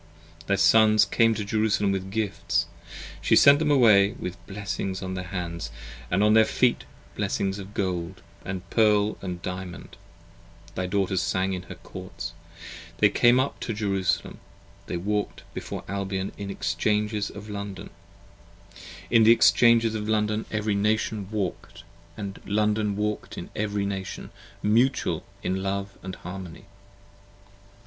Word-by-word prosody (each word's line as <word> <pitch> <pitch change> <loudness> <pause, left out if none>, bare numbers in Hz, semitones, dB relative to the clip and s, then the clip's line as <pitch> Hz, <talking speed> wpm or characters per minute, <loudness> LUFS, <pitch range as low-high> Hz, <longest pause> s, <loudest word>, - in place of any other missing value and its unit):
Thy 100 - +3
Sons 110 +1 +5
came 115 -1 +3
to 105 -1 -3
Jerusalem 105 -1 +1
with 95 -1 -3
gifts. 105 -1 -1 0.6
She - - +3
sent 140 +1 +7
them 155 -1 +1
away 110 -8 +5
With 90 +1 -7
blessings 95 -1 -4
on 95 0 -4
their 90 0 -4
hands 85 -6 -4 0.2
& - - -15
on 105 +4 +4
their 110 0 +7
feet, 120 +2 +1 0.3
blessings 100 -1 -1
of 100 +1 -10
gold, 90 -2 -3 0.2
40 - - -9
And 95 0 -5
pearl 105 -1 +3
& 90 -1 -5
diamond: 90 -1 -7 0.8
thy 90 0 -2
Daughters 95 -1 0
sang 95 +3 0
in 90 - -3
her - - -7
Courts: 85 -2 -8 0.6
They - - +5
came 120 +1 +4
up 135 +2 -1
to 115 - -3
Jerusalem: 100 -3 -1 0.5
they 90 - -2
walked 105 +3 -2
before - - -6
Albion. 95 0 -3
In 100 - -6
the 100 - -5
Exchanges 105 -1 0
of 105 +1 -10
London 100 -2 -6 2.6
every 105 -1 -1
Nation 105 0 0
walk'd, 100 -5 -4 0.3
And 100 -2 -6
London 105 0 +1
walk'd 105 +1 -3
in - - -7
every 105 -1 -1
Nation, 95 -1 -5 0.3
mutual 115 +6 +2 0.2
in 95 +1 -1
love 100 +1 -3 0.2
& - - -8
harmony. 90 0 -8
100 Hz, 135 wpm, -26 LUFS, 95-105 Hz, 2.6 s, sent